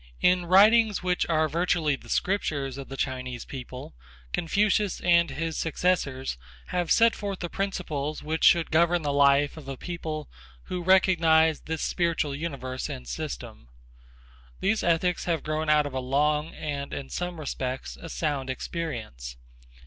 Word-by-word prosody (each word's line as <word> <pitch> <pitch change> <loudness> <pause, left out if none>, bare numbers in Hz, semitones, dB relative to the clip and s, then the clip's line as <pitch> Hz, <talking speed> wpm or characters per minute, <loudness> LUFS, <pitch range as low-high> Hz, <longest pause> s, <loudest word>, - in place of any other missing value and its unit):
In 180 -1 +3
writings 210 +2 +5
which 180 -1 0
are 160 -1 +3
virtually 165 -2 +1
the - - -15
scriptures 140 -8 -1
of 135 - -8
the 135 - -7
Chinese 130 -3 -3
people 130 -1 -8 0.4
Confucius 205 +3 +1
and 170 -1 +4
his 165 0 -3
successors 145 - -1 0.3
have 175 -2 -1
set 230 0 +5
forth 200 -2 -4
the 175 -2 -5
principles 155 -7 -3
which 160 +1 -2
should 170 -1 +5
govern 170 +1 +3
the 145 -1 0
life 140 +1 +4
of 150 -3 -10
a 135 -1 -5
people 155 -3 -5 0.4
who 180 - -4
recognize 165 -4 +4
this 160 0 -4
spiritual 165 -4 0
universe 140 -4 -4
and 60 -1 -7
system. - - -6 0.9
These 215 +2 +1
ethics 170 +1 +1
have 165 -3 -1
grown 155 0 -2
out 150 -1 +4
of 145 - -5
a 130 - -1
long 150 +4 +1
and, 140 -2 -4
in 135 - -7
some 175 -1 -4
respects, 130 -3 -4
a 165 - -10
sound 145 -5 -2
experience. 115 - -5
155 Hz, 150 wpm, -27 LUFS, 140-175 Hz, 0.9 s, writings